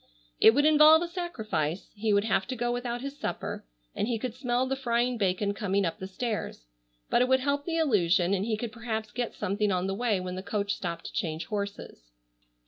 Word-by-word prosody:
It 225 - +7
would 290 +1 +4
involve 310 +1 +7
a - - -2
sacrifice. 220 - -3
He 215 +1 0
would 200 0 +3
have 195 -3 +1
to 255 - -3
go 240 0 -1
without 245 0 -3
his 280 +1 -6
supper, - - -4 0.3
and 210 - -1
he 235 -2 0
could 245 +1 -4
smell 250 0 0
the 265 +1 -1
frying 245 -1 0
bacon 200 -1 0
coming 200 -2 0
up 165 - -3
the 190 - -5
stairs. 210 - -4 0.5
But - - +4
it 250 - +3
would 260 0 +3
help 285 +1 0
the 330 -1 -1
illusion 190 - +3
and 195 -1 +1
he 220 0 -1
could 230 0 -4
perhaps 220 -2 -4
get 240 +1 -3
something 205 +2 0
on 180 0 0
the 195 - -1
way 215 -1 0
when 180 0 -5
the 185 - -4
coach 200 0 -1
stopped 170 -4 -5
to - - -7
change 160 -1 -2
horses. 200 - -5
220 Hz, 220 wpm, -28 LUFS, 195-250 Hz, 0.5 s, It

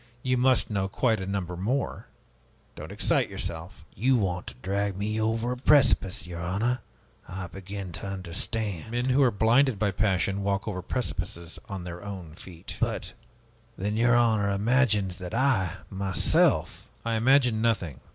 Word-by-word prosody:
You 130 0 +2
must 125 -2 +3
know 100 -2 0
quite 110 +3 +1
a 95 - -5
number 95 -3 -3
more. 120 +10 -2 0.7
Don't - - -8
excite - - +1
yourself." 85 +5 -6
"You 130 +7 +2
want 90 -5 -1
to - - -6
drag 100 0 -1
me 105 +2 -1
over 115 +2 0
a 125 - -3
precipice, 130 -10 +3
your 85 -1 -6
honor! 105 +8 0 0.5
I 95 0 -5
begin 95 +1 -7
to 85 +4 -5
understand!" 95 +1 -3
"Men 120 +2 -1
who 130 +2 +4
are 130 - +6
blinded 120 +3 +3
by 100 0 +1
passion 95 0 +1
walk 100 +1 -1
over 90 -4 -3
precipices 85 -6 -4
on 95 -3 -5
their 90 +1 -7
own 95 -6 -7
feet." 85 0 -10
"But - - -2 0.6
then 105 +3 -2
your 120 +1 +4
honor 110 -4 +3
imagines 105 -3 +2
that 90 +4 -5
I, 115 - +2 0.2
myself 95 -1 +1
" - - -32
"I 115 - 0
imagine 120 -1 +3
nothing. 95 - 0
100 Hz, 160 wpm, -27 LUFS, 95-115 Hz, 0.7 s, are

